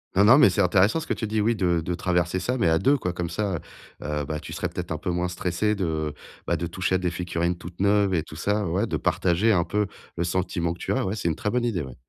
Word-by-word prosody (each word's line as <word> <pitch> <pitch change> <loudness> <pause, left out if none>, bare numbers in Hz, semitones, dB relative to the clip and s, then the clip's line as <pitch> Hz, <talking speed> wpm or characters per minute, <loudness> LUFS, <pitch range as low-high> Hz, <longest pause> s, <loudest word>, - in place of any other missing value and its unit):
Non, 100 +2 +5
non, 120 +5 +8
mais 125 -10 +7
c'est 100 - +1
intéressant 95 - +3
ce 160 - -7
que - - +1
tu 110 - -3
dis, 110 0 0
oui, 115 +3 +2
de 90 -5 +1
de 90 - -2
traverser 90 0 0
ça, 125 +6 -1
mais 90 - +3
à 80 - +4
2 140 - +3
quoi 90 -5 -2
comme 85 -1 -4
ça, 95 -1 -1 0.4
heu, 75 -1 -2
bah 75 +2 -3
tu 75 - -8
serais - - -2
peut-être - - -6
un - - -2
peu - - -4
moins 90 0 0
stressé 90 +4 -1
de, 80 -6 -2 0.3
bah, - - +1
de 85 - -3
toucher 95 +2 -1
à - - +4
des 90 -1 0
figurines 85 0 -2
toutes 85 0 -11
neuves 100 0 +3
et 85 - +2
tout 75 - -11
ça 105 +4 0
ouais, 95 +7 0
de 110 - -2
partager 95 +5 +2
un 90 -5 +3
peu 105 +4 -1 0.3
le 85 - -1
sentiment 85 -1 -1
que - - -12
tu - - -1
as, - - 0
ouais, 95 +3 -2
c'est 90 -6 -1
une 80 - -1
très 105 - -2
bonne 120 +2 0
idée, 105 -8 -1
ouais. 65 -4 -8
90 Hz, 290 wpm, -25 LUFS, 85-105 Hz, 0.4 s, non